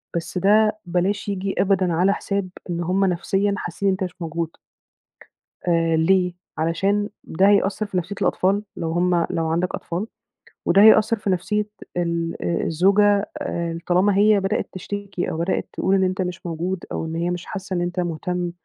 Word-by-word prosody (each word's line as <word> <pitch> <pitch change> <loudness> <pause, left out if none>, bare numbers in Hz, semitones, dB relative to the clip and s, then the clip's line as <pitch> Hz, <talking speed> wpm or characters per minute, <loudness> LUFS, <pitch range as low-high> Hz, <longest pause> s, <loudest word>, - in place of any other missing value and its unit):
بس 170 +2 -3
ده 215 +3 +3
بلاش 185 +4 -1
ييجي 195 0 -2
أبدًا 190 -3 +2
على 185 +4 +3
حساب 200 -2 -2 0.2
إن 175 0 -2
هم 185 +3 +1
نَفْسيًا 195 +3 0
حاسّين 175 +3 -3
إن - - +3
أنت 190 - -3
مش 180 -3 -5
موجود. 165 0 -3 1.1
آآ 165 -1 +2
ليه؟ 180 +2 +3 0.2
علشان 195 +6 0
ده 190 +5 +2
هيأثّر 205 +1 +2
في 200 -3 -4
نَفْسية 180 +3 -3
الأطفال 195 +3 +1
لو 165 -1 -3
هم 175 0 +2
لو 165 -1 -1
عندك 170 +3 0
أطفال، 180 +6 -4 0.6
وده 195 +3 +5
هيأثّر 220 +1 +6
في 205 - -3
نَفْسية 210 +3 0 0.3
ال 170 -1 -1
آآ 170 - -1
الزوجة 200 +4 +3
آآ 170 -11 -3
طالما 190 +3 +3
هي 210 0 +5
بدأت 195 +2 -1
تشتكي 200 0 -4
أو - - -4
بدأت 170 +3 -1
تقول 190 - +1
إن 190 - +3
أنت 185 +1 0
مش 180 -1 -4
موجود 170 +2 -3
أو - - -3
إن 160 0 -5
هي 170 +1 -1
مش 180 0 -4
حاسّة 190 0 -6
إن 175 - 0
أنت 175 +1 -2
مهتم 175 +1 -2
185 Hz, 175 wpm, -22 LUFS, 170-200 Hz, 1.1 s, هيأثّر